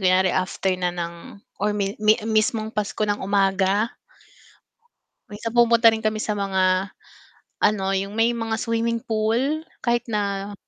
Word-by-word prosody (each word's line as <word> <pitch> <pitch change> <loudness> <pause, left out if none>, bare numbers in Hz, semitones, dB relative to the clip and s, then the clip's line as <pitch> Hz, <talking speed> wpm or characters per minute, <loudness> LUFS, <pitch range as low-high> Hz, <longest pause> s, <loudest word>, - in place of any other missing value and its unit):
kunyari 185 0 +3
after 185 0 0
na 180 -1 -1
ng 170 +1 -6 0.2
or 210 0 0
mi 200 -1 -1
mi 215 0 +5
mismong 220 0 0
Pasko 210 +1 -2
ng 205 0 -1
umaga. 195 +2 +1 1.3
Minsan 215 +2 -6
pumunta 235 -1 +6
rin 225 - -2
kami 215 0 0
sa 210 -1 -2
mga 190 0 +1 0.7
ano, 210 -2 +2
yung 195 +2 -2
may 225 +1 +3
mga 225 -1 -2
swimming 230 0 -1
pool 230 +8 0 0.2
kahit 240 0 +1
na 200 -2 -2
210 Hz, 140 wpm, -23 LUFS, 195-225 Hz, 1.3 s, pumunta